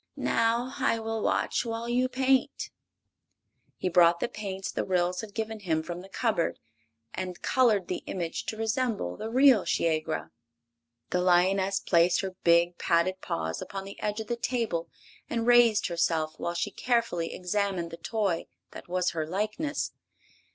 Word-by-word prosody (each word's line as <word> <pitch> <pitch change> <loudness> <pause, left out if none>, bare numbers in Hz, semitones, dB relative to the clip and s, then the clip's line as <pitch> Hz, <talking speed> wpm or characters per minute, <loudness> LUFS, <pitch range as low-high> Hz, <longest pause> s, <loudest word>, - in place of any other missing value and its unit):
"Now 230 +2 +1
I 230 - +2
will 225 0 -3
watch - - +1
while 230 0 -4
you 250 +2 +1
paint." 265 0 +1 1.1
He - - -2
brought 170 -1 +5
the - - 0
paints 195 -4 -5
the - - -2
Ryls 180 -1 0
had 210 -2 -10
given 220 0 -3
him 160 -5 -1
from 175 +1 -6
the 190 - -13
cupboard 215 -5 0 0.6
and 185 -1 -5
colored 220 -8 +3
the 180 - -3
image 170 -3 -4
to 220 - -3
resemble 225 - -1
the 220 - -5
real 255 -3 +6
Shiegra. 160 -1 -1 0.8
The 180 - +1
lioness 190 +2 +3
placed 170 0 +3
her 190 -2 -5
big, 170 +1 +4
padded 185 +3 +1
paws 80 0 -3
upon 195 -1 -5
the 195 0 -10
edge 210 +1 -1
of 220 - -4
the 240 - -2
table 235 -8 -2 0.4
and 230 -1 -1
raised 240 -3 +5
herself 165 -3 0
while 170 0 -2
she 170 - -1
carefully 235 -9 0
examined 185 -2 -1
the 165 - -7
toy 195 -1 -1 0.2
that - - -10
was 180 0 0
her 160 -2 -3
likeness. 215 - -2
195 Hz, 160 wpm, -28 LUFS, 175-225 Hz, 1.1 s, real